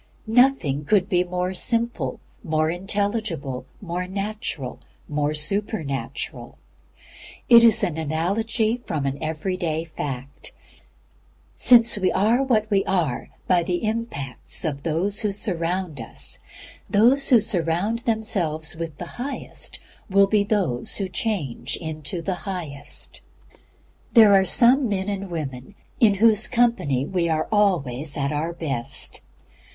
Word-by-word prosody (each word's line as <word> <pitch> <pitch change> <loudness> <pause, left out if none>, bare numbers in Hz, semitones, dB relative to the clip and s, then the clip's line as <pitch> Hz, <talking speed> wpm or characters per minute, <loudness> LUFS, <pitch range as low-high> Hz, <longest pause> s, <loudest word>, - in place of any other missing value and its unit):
Nothing 225 - +2
could 190 +4 +2
be 180 -3 +2
more 180 +1 -3
simple, 230 - -1 0.2
more 155 0 0
intelligible, 185 - -2
more 180 -1 -4
natural, 195 - -4 0.3
more 150 0 -1
supernatural. 155 -3 -4 0.9
It 235 -2 +8
is 230 -3 +6
an 160 -2 -1
analogy 215 +9 -1
from 150 - -3
an 135 +1 -2
every 160 +4 -2
day 165 -2 -2
fact. 135 -1 -6 1.0
Since 235 -3 +6
we 185 -1 +2
are 220 +7 +3
what 230 -5 +1
we 195 -1 +3
are 165 -9 -1 0.2
by 180 -1 +4
the 175 +3 -2
impacts 215 - -3
of 140 -3 -3
those 170 +6 0
who 210 -2 -1
surround 175 - -1
us, 115 - -3 0.5
those 245 +7 +4
who 245 - +7
surround 190 +2 0
themselves 180 -10 -1
with 160 -3 -6
the - - -6 0.2
highest 275 +2 -5 0.3
will 195 +1 +5
be 205 +1 +2
those 195 - 0
who 195 - -2
change 180 - -3
into 160 +1 -5
the 190 - -1 0.2
highest. 155 -7 -8 0.9
There 220 -4 +8
are 190 -1 +5
some 250 +4 +5
men 190 -1 -2
and 200 -1 -3
some - - -11
women 145 0 -6 0.2
in 210 -4 +5
whose 220 +1 +5
company 230 - +1
we 170 0 -1
are 155 -1 0
ALWAYS 160 - +1
AT 140 0 -1
OUR 155 +3 -2
BEST. 140 -8 -3
180 Hz, 130 wpm, -23 LUFS, 155-215 Hz, 1.0 s, It